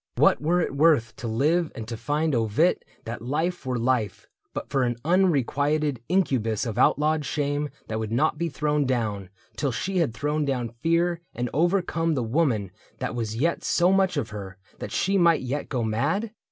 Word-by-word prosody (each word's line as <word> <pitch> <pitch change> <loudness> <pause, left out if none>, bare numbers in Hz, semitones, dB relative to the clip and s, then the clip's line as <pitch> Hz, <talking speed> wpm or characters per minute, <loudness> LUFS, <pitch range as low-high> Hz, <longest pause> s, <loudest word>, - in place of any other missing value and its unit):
What - - +4
were 170 +4 +2
it 140 - -2
worth 140 -7 +3
To 115 +2 -5
live 155 +9 +1
and 110 -1 -6
to 115 - -4
find 145 +7 -1
ovit 115 - +2 0.3
that 115 0 -5
life 155 +6 -2
were 125 -1 0
life 115 -5 0 0.3
But - - -5
for 135 - 0
an 120 -1 +1
unrequited 150 -5 +2
incubus 130 - +1
Of 115 0 -3
outlawed 150 +3 +3
shame 145 0 -1 0.2
that 110 0 -3
would 110 -1 -4
not 150 +6 +1
be 170 0 0
thrown 150 -1 0
down 105 -7 -1 0.3
Till 140 -3 0
she 185 - -2
had 145 -9 0
thrown 150 +3 -1
down 130 -4 -1
fear 165 +8 0
and 120 0 -2
overcome 165 -1 +1
The 130 - 0
woman 115 - 0 0.3
that - - -3
was 115 -2 -3
yet 165 +9 0
so 175 +1 +3
much 190 -3 +2
of 145 - -2
her 95 -3 -7 0.2
That - - -6
she 195 +1 +1
might 170 -2 +4
yet 130 +3 -3
go 125 -4 -1
mad 145 - 0
140 Hz, 185 wpm, -25 LUFS, 115-165 Hz, 0.3 s, What